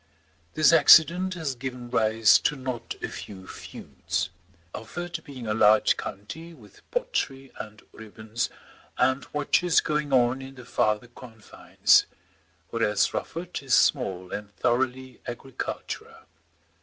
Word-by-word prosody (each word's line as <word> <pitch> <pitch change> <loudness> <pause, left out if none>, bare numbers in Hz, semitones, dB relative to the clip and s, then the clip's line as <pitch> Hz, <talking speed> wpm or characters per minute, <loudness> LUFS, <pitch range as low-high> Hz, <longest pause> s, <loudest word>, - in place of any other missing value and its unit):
This 155 +1 +5
accident 180 +3 +6
has 160 -6 -3
given 125 -1 -7
rise 110 0 +4
to 150 - 0
not 130 -3 -5
a - - 0
few 95 -2 -9
feuds, - - -5 0.4
Ufford 170 +7 -6
being 135 -5 -9
a 105 - -1
large 110 0 +5
county, 160 - -8
with 105 -8 -18
pottery, 135 - -2
and 105 0 -9
ribbons, 110 +1 -5 0.5
and 130 +2 +1
watches 160 +4 +2
going 150 -2 -1
on 130 0 +3
in 135 0 -10
the 125 -2 -12
farther 105 -1 0
confines; 115 -3 +1 0.6
whereas 105 -3 +1
Rufford 175 +2 -5
is 135 -2 +2
small 95 -10 +1
and 105 -1 -5
thoroughly 130 +4 -1
agricultural. 125 +2 -6
125 Hz, 120 wpm, -26 LUFS, 110-150 Hz, 0.6 s, accident